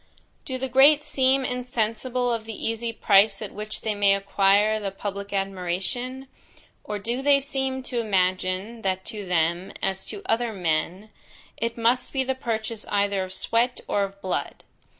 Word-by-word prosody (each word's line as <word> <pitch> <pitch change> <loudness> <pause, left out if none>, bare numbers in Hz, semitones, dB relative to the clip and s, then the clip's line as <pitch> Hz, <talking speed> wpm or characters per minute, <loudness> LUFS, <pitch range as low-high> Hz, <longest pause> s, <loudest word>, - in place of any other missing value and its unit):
"Do 260 - -3
the 265 +1 -2
great 280 +4 +6
seem 265 -1 +2
insensible 245 0 -1
of 225 -1 -3
the 225 -1 -6
easy 225 +1 -2
price 200 -2 +4
at 210 -3 -6
which 210 +1 -5
they 220 - -1
may 200 -1 +4
acquire 200 +2 +3
the 200 -2 -2
public 200 +1 -6
admiration? 195 +7 -3 0.6
or 210 - -4
do 235 +6 -3
they 280 0 +5
seem 265 -1 -2
to 250 -2 -3
imagine, 190 +1 0
that 190 -1 -1
to 210 -4 -6
them, 170 +1 +1
as 190 0 -1
to 405 - -7
other 230 -3 0
men, 180 +3 -1 0.4
it 230 +1 -3
must 240 +2 +1
be 265 -1 +1
the 265 0 0
purchase 230 -3 -3
either 200 -1 +1
of 185 - -7
sweat 235 +5 +1
or 205 - +1
of 195 0 -6
blood? 185 - -3
215 Hz, 165 wpm, -25 LUFS, 195-250 Hz, 0.6 s, great